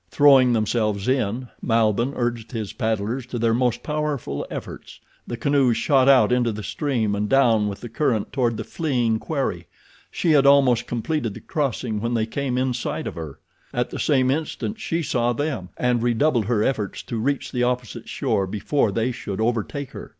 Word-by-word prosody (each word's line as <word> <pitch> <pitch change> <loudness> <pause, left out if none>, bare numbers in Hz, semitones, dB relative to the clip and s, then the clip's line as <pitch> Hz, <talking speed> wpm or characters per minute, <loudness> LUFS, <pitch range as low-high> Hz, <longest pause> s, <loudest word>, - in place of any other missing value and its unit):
Throwing 135 -2 +6
themselves 110 -2 0
in, 125 -1 0
Malbihn 115 +2 +1
urged 120 -1 -3
his 110 -4 -4
paddlers 110 +3 -2
to 125 - -4
their 115 -1 +2
most 125 -1 0
powerful 150 - -3
efforts. - - -8 0.3
The 120 - -4
canoes 135 -2 +2
shot 135 -2 +3
out 125 -6 +6
into 125 -2 +2
the 105 0 -6
stream 120 -8 -1
and 105 0 -1
down 115 -6 +4
with 100 -1 -5
the 120 - -6
current 115 -3 -1
toward 120 -4 +1
the - - -4
fleeing 120 -9 0
quarry. 140 0 -3 0.4
She 170 - 0
had 140 -2 +5
almost 135 -4 +4
completed 120 -1 -2
the - - -8
crossing 125 -8 -2
when 115 +1 -1
they 110 -1 +1
came 125 +2 -2
in 130 0 +1
sight 120 - -3
of - - -4
her. 80 -4 -7 0.4
At - - -1
the - - -5
same 130 -3 +2
instant 160 +8 -3
she 165 -3 -2
saw 120 -3 +1
them, 135 - -3
and 125 -2 +1
redoubled 120 0 +2
her 110 -1 +1
efforts 110 -7 -2
to 115 - -4
reach 140 +4 -1
the 125 - -1
opposite 125 -1 -2
shore 95 -1 0
before 105 +4 0
they 115 +5 0
should 105 -5 -6
overtake 120 +4 -1
her. - - -9
120 Hz, 185 wpm, -23 LUFS, 110-135 Hz, 0.4 s, Throwing